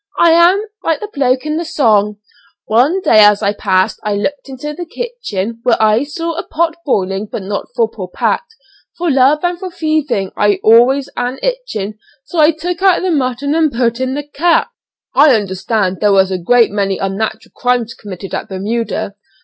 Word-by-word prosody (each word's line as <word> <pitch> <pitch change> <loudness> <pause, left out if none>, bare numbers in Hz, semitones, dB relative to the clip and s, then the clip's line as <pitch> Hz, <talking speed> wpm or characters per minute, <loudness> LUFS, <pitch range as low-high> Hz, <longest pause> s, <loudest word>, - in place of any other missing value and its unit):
I 340 - +5
am 350 +5 +4 0.2
like 325 -2 0
the 425 0 -7
bloke 260 -1 +1
in 305 0 -1
the 335 - -2
song 210 -9 +1 0.5
'One 265 - +2
day 220 - +5
as 210 0 +4
I 200 - +1
passed 190 0 0
I 210 -1 -1
looked 275 +7 -3
into 270 +3 -6
the 350 +2 -7
kitchen, 235 - -5
Where 235 0 +2
I 220 +4 +3
saw 330 +3 -4
a - - -3
pot 330 0 -1
boiling, 195 -5 -1
but 200 - -5
not 200 +1 -4
for 230 - +2
poor 200 -4 -8
Pat; 180 - 0 0.6
For 345 -2 0
love 275 +4 +3
and 350 0 -1
for 375 - -5
thieving 310 - -1
I'd 205 -2 +2
always 250 +5 +5
an 245 +2 -2
itchin', 335 - -3 0.2
So 335 - -4
I 305 0 +6
took 335 +3 -3
out 380 -2 +3
the 370 - 0
mutton 275 -1 -1
and 315 -2 +2
put 235 -1 0
in 260 +1 -2
the 290 - -3
cat.'" 335 +9 +1 0.4
"I 285 -2 +6
understand 190 -1 -1
there 210 -1 +3
was 190 -1 +3
a 185 - -2
great 235 +6 +3
many 195 -2 -1
unnatural 195 +3 -3
crimes 245 -2 0
committed 195 -2 -9
at - - -4
Bermuda?" 205 +2 -3
250 Hz, 190 wpm, -15 LUFS, 210-315 Hz, 0.6 s, I